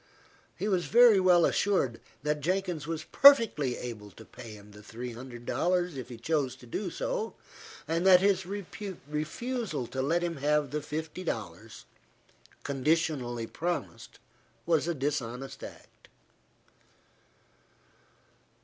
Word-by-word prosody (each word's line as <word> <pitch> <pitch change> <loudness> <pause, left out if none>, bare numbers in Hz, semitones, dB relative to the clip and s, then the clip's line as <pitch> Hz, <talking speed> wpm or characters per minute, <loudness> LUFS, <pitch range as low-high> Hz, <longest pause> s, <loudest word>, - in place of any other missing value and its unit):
He 205 - -2
was 185 -4 +1
very 235 -3 +7
well 180 -2 +5
assured 160 - +1 0.2
that 150 0 0
Jenkins 180 -2 -1
was 165 -1 -3
perfectly 230 - +6
able 110 -4 -7
to 110 +3 -14
pay 115 -1 -11
him 105 0 -14
the 105 0 -13
three 120 +3 -7
hundred 120 0 -10
dollars, 180 +1 0
if 130 -3 -7
he 120 - -8
chose 140 +1 -1
to - - -15
do 160 - -3
so, - - -3 0.5
and 165 +2 0
that 185 -1 +8
his 190 -1 +2
refusal 190 - -4
to 130 +3 -4
let 165 +6 +1
him 170 -2 -2
have 150 0 +1
the 150 0 -2
fifty 160 +5 -5
dollars, 110 - -6 0.8
conditionally 135 -4 0
promised, 165 - -4 0.5
was 165 -1 +2
a 170 - -1
dishonest 135 -2 -3
act. - - -12
150 Hz, 130 wpm, -29 LUFS, 125-180 Hz, 0.8 s, that